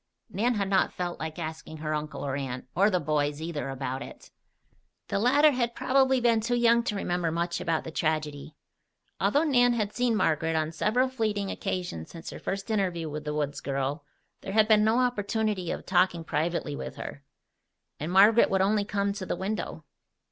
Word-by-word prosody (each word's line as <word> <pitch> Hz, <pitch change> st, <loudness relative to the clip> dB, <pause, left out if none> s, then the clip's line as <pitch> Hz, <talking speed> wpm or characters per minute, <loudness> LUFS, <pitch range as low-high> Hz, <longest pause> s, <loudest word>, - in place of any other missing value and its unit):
Nan 230 Hz, +4 st, +1 dB
had 200 Hz, -2 st, 0 dB
not 195 Hz, -1 st, +2 dB
felt 175 Hz, -1 st, -4 dB
like 160 Hz, +1 st, -5 dB
asking 160 Hz, -1 st, -6 dB
her 155 Hz, 0 st, -3 dB
uncle 150 Hz, -1 st, -4 dB
or 135 Hz, -1 st, -2 dB
aunt, 130 Hz, -3 st, -4 dB
or 200 Hz, +4 st, +4 dB
the 185 Hz, -3 st, +1 dB
boys, 145 Hz, -1 st, 0 dB
either, 160 Hz, -3 st, -4 dB
about 135 Hz, 0 st, -4 dB
it. -, -, -11 dB, 0.8 s
The -, -, 0 dB
latter 285 Hz, +7 st, +5 dB
had 240 Hz, -3 st, -1 dB
probably 265 Hz, 0 st, +3 dB
been 235 Hz, -2 st, +3 dB
too 245 Hz, +3 st, 0 dB
young 235 Hz, 0 st, +4 dB
to 210 Hz, -, -1 dB
remember 175 Hz, -3 st, -1 dB
much 170 Hz, +1 st, -2 dB
about 165 Hz, -2 st, 0 dB
the 160 Hz, -, -7 dB
tragedy. 155 Hz, -2 st, -2 dB, 0.6 s
Although 290 Hz, +3 st, +3 dB
Nan 245 Hz, -5 st, +4 dB
had 210 Hz, -3 st, -1 dB
seen 245 Hz, -2 st, +1 dB
Margaret 160 Hz, -4 st, +1 dB
on 155 Hz, 0 st, 0 dB
several 220 Hz, +10 st, +1 dB
fleeting 215 Hz, -6 st, -1 dB
occasions 180 Hz, -, -4 dB
since 165 Hz, 0 st, -8 dB
her -, -, -8 dB
first 195 Hz, +3 st, -4 dB
interview 180 Hz, -7 st, -1 dB
with 150 Hz, 0 st, -6 dB
the 150 Hz, 0 st, -2 dB
woods 145 Hz, -1 st, -2 dB
girl, 140 Hz, +2 st, -2 dB, 0.4 s
there 195 Hz, -, -6 dB
had 215 Hz, 0 st, +4 dB
been 215 Hz, -1 st, +5 dB
no 220 Hz, +2 st, +3 dB
opportunity 215 Hz, -6 st, 0 dB
of -, -, -4 dB
talking 180 Hz, -2 st, +2 dB
privately 160 Hz, -1 st, -1 dB
with -, -, -6 dB
her. 145 Hz, -, -8 dB, 0.8 s
And 155 Hz, +4 st, -3 dB
Margaret 205 Hz, +5 st, +6 dB
would 190 Hz, -1 st, +2 dB
only 205 Hz, +1 st, +2 dB
come 200 Hz, 0 st, -1 dB
to 200 Hz, -2 st, -6 dB
the -, -, -1 dB
window. 190 Hz, -3 st, -4 dB
185 Hz, 190 wpm, -28 LUFS, 155-220 Hz, 0.8 s, Margaret